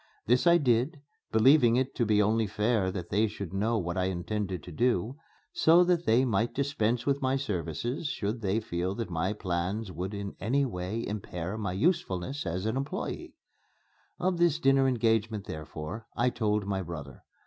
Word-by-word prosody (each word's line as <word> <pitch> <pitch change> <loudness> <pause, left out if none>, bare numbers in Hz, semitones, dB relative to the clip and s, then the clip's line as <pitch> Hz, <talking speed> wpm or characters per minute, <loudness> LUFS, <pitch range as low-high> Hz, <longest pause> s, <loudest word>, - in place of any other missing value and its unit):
This 125 +8 +3
I 170 0 +7
did, 135 +2 +1 0.3
believing 120 +1 +5
it 130 +1 0
to 120 - +1
be 105 -1 +4
only 110 +1 +2
fair 105 -1 +1
that 90 -2 -6
they 105 +3 +3
should 100 -4 -7
know 110 +4 +1
what 85 -2 -2
I 90 - +1
intended 95 0 -3
to 90 - -9
do, 120 - 0 0.4
so 170 +3 +6
that 175 -1 +1
they 120 +4 +4
might 115 +1 0
dispense 120 -4 0
with 140 0 +1
my 130 0 +1
services 120 - -3
should 110 -3 -3
they 100 +1 +1
feel 90 -1 -2
that 115 -5 -4
my 85 +3 0
plans 95 +1 -2
would 90 +4 -4
in 100 0 -5
any 135 +8 +1
way 100 0 -3
impair 95 -3 -4
my 100 -4 -3
usefulness 135 - 0
as 90 +4 -2
an 125 +5 0
employé. 140 - -5 0.9
Of 180 0 +1
this 170 -3 +3
dinner 135 -3 +4
engagement, 110 -4 +1
therefore, 80 +7 -7
I 125 +1 +2
told 105 -3 0
my 100 -1 -1
brother. 75 -7 -8
110 Hz, 175 wpm, -29 LUFS, 95-130 Hz, 0.9 s, I